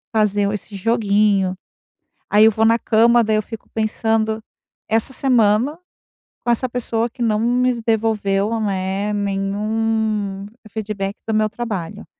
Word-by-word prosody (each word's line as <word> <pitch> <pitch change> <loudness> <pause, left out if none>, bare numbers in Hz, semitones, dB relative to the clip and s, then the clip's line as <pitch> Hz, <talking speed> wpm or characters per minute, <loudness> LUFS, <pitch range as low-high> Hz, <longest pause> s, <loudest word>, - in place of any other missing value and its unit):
fazer 205 -2 +2
esse 210 0 -7
joguinho. 200 -3 +1 0.7
Aí 210 +1 +6
eu - - +7
vou 220 +1 +1
na 230 +1 +4
cama, 235 +1 +4
daí 215 -1 +1
eu 215 - +1
fico 225 0 -10
pensando: 220 0 0 0.5
"Essa 225 +4 +1
semana, 250 +2 +2 0.7
com 240 - +1
essa 240 +2 +1
pessoa 235 -1 -1
que 245 - -7
não 215 -2 +1
me 245 +1 +1
devolveu, 220 -1 0
né, 195 0 -1
nenhum 205 0 -1 0.2
feedback 200 -2 -4
do 225 - -1
meu 215 0 +2
trabalho". 210 -4 -5
215 Hz, 135 wpm, -20 LUFS, 205-225 Hz, 0.7 s, eu